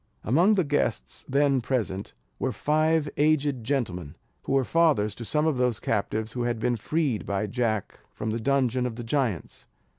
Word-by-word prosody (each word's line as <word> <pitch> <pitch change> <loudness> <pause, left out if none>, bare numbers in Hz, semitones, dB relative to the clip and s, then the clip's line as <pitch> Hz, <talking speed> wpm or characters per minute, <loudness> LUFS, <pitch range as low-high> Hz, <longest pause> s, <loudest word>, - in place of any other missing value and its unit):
Among 175 - +4
the 185 - +3
guests 105 - -1
then 140 -1 +3
present 110 -6 -2 0.2
were - - 0
five 155 +1 +1
aged 145 -4 +2
gentlemen, 100 - -2 0.3
who - - -1
were 135 -1 +4
fathers 145 -9 +2
to 120 - -8
some 150 +6 +1
of 155 -4 +1
those 125 -3 +1
captives 110 +1 -1
who 125 - -4
had 120 -1 0
been 120 +2 +1
freed 135 0 -1
by 100 +1 -1
Jack 110 -1 -2
from 110 +1 -4
the 115 - -2
dungeon 130 0 +1
of 115 - -6
the 120 - -6
giants. 115 - -2
125 Hz, 175 wpm, -26 LUFS, 110-145 Hz, 0.3 s, Among